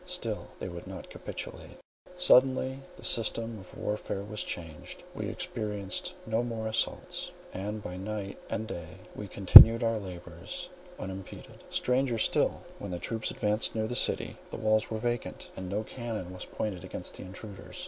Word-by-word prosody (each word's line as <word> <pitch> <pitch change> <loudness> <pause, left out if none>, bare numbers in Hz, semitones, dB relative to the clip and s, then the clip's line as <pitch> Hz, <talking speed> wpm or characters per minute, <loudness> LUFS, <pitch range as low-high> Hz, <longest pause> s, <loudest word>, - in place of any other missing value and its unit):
Still 120 -13 -3
they - - -5
would 85 -1 -8
not - - -8
capitulate. - - -8 0.4
Suddenly 130 -5 +5 0.2
the - - -13
system 115 0 +1
of 95 - -8
warfare 105 -1 -3
was 105 +1 -5
changed. 80 -3 -7
We - - -4
experienced 105 -3 -3
no 110 +1 +1
more 115 -2 -3
assaults; 110 - -1 0.2
and 105 +3 -4
by 90 - -6
night 100 0 -5
and 110 - -2
day 85 -3 -7 0.2
we 105 - -6
continued 110 +5 +11
our 115 -1 +1
labours 90 - -7 0.3
unimpeded. 95 0 -8
Stranger 125 -1 +1
still, 110 - +2 0.2
when 100 - -6
the 90 - -3
troops 110 +6 -3
advanced 105 +2 0
near 110 -1 0
the 120 +2 -3
city, - - -1
the - - -6
walls 110 0 +2
were 110 - -2
vacant, 120 +1 -3
and 95 -1 -6
no 105 +3 -1
cannon 110 -6 -5
was 90 - -7
pointed 100 -5 -4
against - - -6
the - - -7
intruders. 95 +2 -9
105 Hz, 160 wpm, -30 LUFS, 95-115 Hz, 0.4 s, continued